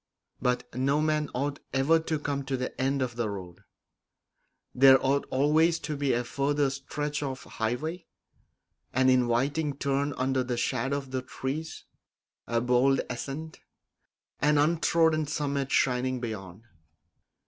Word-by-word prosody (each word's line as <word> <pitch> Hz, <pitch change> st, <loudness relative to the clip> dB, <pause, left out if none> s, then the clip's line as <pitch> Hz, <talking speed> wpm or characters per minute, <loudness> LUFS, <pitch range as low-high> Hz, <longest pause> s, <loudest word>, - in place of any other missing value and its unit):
But 125 Hz, -1 st, 0 dB
no 135 Hz, +4 st, +1 dB
man 155 Hz, -1 st, +1 dB
ought 140 Hz, +2 st, -2 dB, 0.2 s
ever 145 Hz, +5 st, +4 dB
to 160 Hz, -1 st, -2 dB
come 145 Hz, -1 st, -3 dB
to 135 Hz, -1 st, -1 dB
the 125 Hz, +1 st, -4 dB
end 135 Hz, 0 st, +1 dB
of 125 Hz, -2 st, -4 dB
the 115 Hz, -3 st, -1 dB
road; 90 Hz, -4 st, -7 dB, 1.1 s
there 135 Hz, +1 st, +8 dB
ought 140 Hz, +1 st, +1 dB
always 155 Hz, +5 st, +3 dB
to 150 Hz, -, -3 dB
be 140 Hz, -1 st, 0 dB
a 120 Hz, +1 st, 0 dB
further 140 Hz, +2 st, 0 dB
stretch 145 Hz, +2 st, -4 dB
of 135 Hz, -3 st, -4 dB
highway, 155 Hz, +10 st, -3 dB, 0.9 s
an 130 Hz, +1 st, +4 dB
inviting 130 Hz, +4 st, +1 dB
turn 140 Hz, 0 st, 0 dB
under 130 Hz, 0 st, +1 dB
the 125 Hz, -1 st, -3 dB
shadow 135 Hz, +3 st, 0 dB
of 135 Hz, -2 st, -7 dB
the 130 Hz, -1 st, -1 dB
trees, 140 Hz, +5 st, -5 dB, 0.6 s
a 115 Hz, 0 st, +1 dB
bold 125 Hz, +3 st, +3 dB
ascent, 140 Hz, +6 st, -6 dB, 0.8 s
an 150 Hz, 0 st, +3 dB
untrodden 160 Hz, 0 st, +3 dB
summit 140 Hz, -2 st, -2 dB
shining 125 Hz, 0 st, +1 dB
beyond. 105 Hz, -4 st, -6 dB
135 Hz, 135 wpm, -28 LUFS, 125-150 Hz, 1.1 s, there